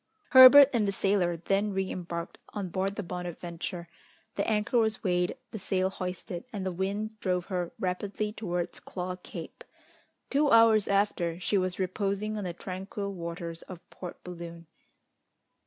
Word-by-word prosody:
Herbert 265 Hz, +1 st, +10 dB
and 220 Hz, -4 st, +2 dB
the -, -, +1 dB
sailor 190 Hz, -3 st, +1 dB
then 195 Hz, +4 st, 0 dB
re 190 Hz, 0 st, -1 dB
embarked 170 Hz, -1 st, -5 dB, 0.2 s
on 200 Hz, -3 st, -3 dB
board 190 Hz, +2 st, -1 dB
the 205 Hz, -, -3 dB
Bonadventure, 175 Hz, 0 st, -5 dB, 0.5 s
the -, -, 0 dB
anchor 215 Hz, +2 st, +2 dB
was 220 Hz, -1 st, 0 dB
weighed, 180 Hz, +3 st, 0 dB
the 220 Hz, -, -6 dB
sail 190 Hz, 0 st, 0 dB
hoisted, 180 Hz, -1 st, -5 dB
and 200 Hz, -3 st, -4 dB
the 185 Hz, -, -1 dB
wind 205 Hz, +4 st, -3 dB
drove 180 Hz, -3 st, -1 dB
her 175 Hz, -1 st, -1 dB
rapidly 205 Hz, +3 st, -2 dB
towards 175 Hz, -5 st, -3 dB
Claw 180 Hz, 0 st, -5 dB
Cape. 180 Hz, -, -9 dB, 0.7 s
Two 285 Hz, +1 st, +3 dB
hours 225 Hz, -3 st, +6 dB
after, 195 Hz, -4 st, +1 dB
she 195 Hz, -, 0 dB
was 185 Hz, -1 st, -1 dB
reposing 200 Hz, +3 st, -1 dB
on 210 Hz, -2 st, -4 dB
the 180 Hz, -, -2 dB
tranquil 195 Hz, +3 st, -5 dB
waters 170 Hz, -1 st, -6 dB
of 180 Hz, -2 st, -11 dB
Port 180 Hz, -2 st, -9 dB
Balloon. 170 Hz, -1 st, -8 dB
190 Hz, 155 wpm, -29 LUFS, 175-210 Hz, 0.7 s, Herbert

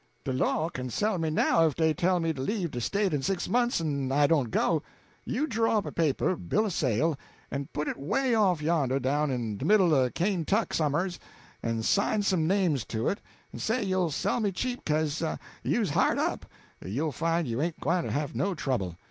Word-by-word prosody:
De 135 Hz, -, -2 dB
law 155 Hz, +4 st, +1 dB
kin 130 Hz, -6 st, -5 dB
sell 205 Hz, -, 0 dB
me 160 Hz, -1 st, 0 dB
now 165 Hz, +1 st, +3 dB
if 150 Hz, -, -2 dB
dey 160 Hz, -1 st, +2 dB
tell 180 Hz, +1 st, +1 dB
me 165 Hz, -1 st, 0 dB
to 135 Hz, -, -6 dB
leave 180 Hz, +2 st, -1 dB
de 120 Hz, -, -4 dB
State 200 Hz, -, 0 dB
in 145 Hz, -, 0 dB
six 190 Hz, +4 st, -1 dB
months 240 Hz, -3 st, +2 dB
en 140 Hz, -5 st, -2 dB
I 145 Hz, +2 st, +4 dB
don't 145 Hz, -6 st, +2 dB
go. 155 Hz, +7 st, +1 dB, 0.4 s
You 280 Hz, +6 st, 0 dB
draw 225 Hz, -4 st, +1 dB
up 205 Hz, -, -1 dB
a -, -, -4 dB
paper 160 Hz, +2 st, +1 dB
bill 215 Hz, +5 st, 0 dB
o' -, -, -1 dB
sale 145 Hz, -, 0 dB, 0.3 s
en 140 Hz, 0 st, -3 dB
put 150 Hz, 0 st, -3 dB
it -, -, -3 dB
'way 255 Hz, -, 0 dB
off 190 Hz, -8 st, +2 dB
yonder, 145 Hz, -5 st, +1 dB
down 145 Hz, +3 st, +1 dB
in 115 Hz, -5 st, -2 dB
de -, -, -4 dB
middle 185 Hz, -3 st, +5 dB
o' 130 Hz, -3 st, +3 dB
Kaintuck 195 Hz, -, 0 dB
somers, 170 Hz, +4 st, 0 dB, 0.4 s
en 115 Hz, -1 st, -2 dB
sign 205 Hz, -, +2 dB
some 180 Hz, -6 st, +1 dB
names 175 Hz, -, +2 dB
to 110 Hz, 0 st, -1 dB
it, 200 Hz, -, -2 dB, 0.3 s
en -, -, -7 dB
say 225 Hz, +2 st, 0 dB
you'll 185 Hz, -3 st, +1 dB
sell 155 Hz, -, 0 dB
me 210 Hz, -3 st, +1 dB
cheap 245 Hz, +6 st, -3 dB
'ca'se 155 Hz, -1 st, 0 dB, 0.4 s
you's -, -, 0 dB
hard -, -, +2 dB
up; -, -, -1 dB, 0.4 s
you'll 140 Hz, +11 st, -2 dB
find 165 Hz, +3 st, 0 dB
you 120 Hz, +3 st, -2 dB
ain't 165 Hz, +1 st, -2 dB
gwyne 180 Hz, -, +1 dB
to -, -, -4 dB
have 145 Hz, 0 st, -2 dB
no 185 Hz, +10 st, 0 dB
trouble. 105 Hz, -, -2 dB
160 Hz, 210 wpm, -28 LUFS, 140-195 Hz, 0.4 s, middle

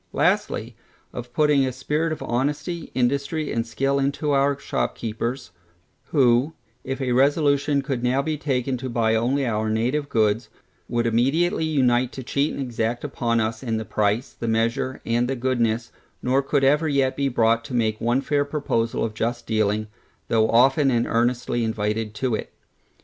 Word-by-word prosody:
Lastly, -, -, 0 dB, 0.4 s
of 120 Hz, 0 st, -7 dB
putting 150 Hz, 0 st, +3 dB
a 130 Hz, -, 0 dB
spirit 150 Hz, +5 st, -1 dB
of 155 Hz, -, -4 dB
honesty, 145 Hz, +7 st, -2 dB
industry, 140 Hz, +5 st, 0 dB
and 115 Hz, 0 st, -1 dB
skill 135 Hz, +4 st, 0 dB
into 140 Hz, +2 st, 0 dB
our 140 Hz, 0 st, +2 dB
shopkeepers, 115 Hz, -4 st, -3 dB, 0.5 s
who, 130 Hz, +1 st, +3 dB, 0.3 s
if 135 Hz, +1 st, -4 dB
a 130 Hz, -2 st, -1 dB
resolution 140 Hz, +1 st, +2 dB
could 135 Hz, -4 st, -2 dB
now 125 Hz, +2 st, +1 dB
be 155 Hz, +1 st, -1 dB
taken 135 Hz, -3 st, -1 dB
to 130 Hz, +1 st, -5 dB
buy 115 Hz, -2 st, +1 dB
only 125 Hz, +5 st, +1 dB
our 110 Hz, -2 st, -1 dB
native 125 Hz, +7 st, 0 dB
goods, 110 Hz, 0 st, +1 dB, 0.4 s
would 120 Hz, -1 st, 0 dB
immediately 135 Hz, +9 st, +2 dB
unite 130 Hz, -5 st, +2 dB
to 130 Hz, -, -6 dB
cheat 140 Hz, +4 st, 0 dB
and -, -, -6 dB
exact 120 Hz, -1 st, -2 dB
upon 120 Hz, -5 st, 0 dB
us 110 Hz, 0 st, -2 dB
in 115 Hz, -3 st, -2 dB
the 110 Hz, -, -4 dB
price, 105 Hz, +6 st, 0 dB
the 115 Hz, -, -5 dB
measure, 115 Hz, +3 st, 0 dB
and 120 Hz, +1 st, +1 dB
the 135 Hz, -, -1 dB
goodness, 120 Hz, -2 st, 0 dB, 0.3 s
nor 130 Hz, +2 st, +2 dB
could 140 Hz, 0 st, 0 dB
ever 150 Hz, +4 st, +3 dB
yet 135 Hz, -2 st, +1 dB
be 140 Hz, -1 st, 0 dB
brought 115 Hz, -1 st, +2 dB
to 125 Hz, -, -5 dB
make 110 Hz, -2 st, 0 dB
one 120 Hz, +3 st, +1 dB
fair 145 Hz, 0 st, +1 dB
proposal 140 Hz, -6 st, -1 dB
of 110 Hz, -, -4 dB
just 120 Hz, +2 st, -2 dB
dealing, 110 Hz, -1 st, 0 dB, 0.4 s
though 110 Hz, -1 st, +3 dB
often 135 Hz, +4 st, +4 dB
and 120 Hz, -2 st, +2 dB
earnestly 120 Hz, 0 st, 0 dB
invited 110 Hz, 0 st, -2 dB
to 125 Hz, +1 st, -1 dB
it. -, -, -3 dB
125 Hz, 170 wpm, -23 LUFS, 115-140 Hz, 0.5 s, often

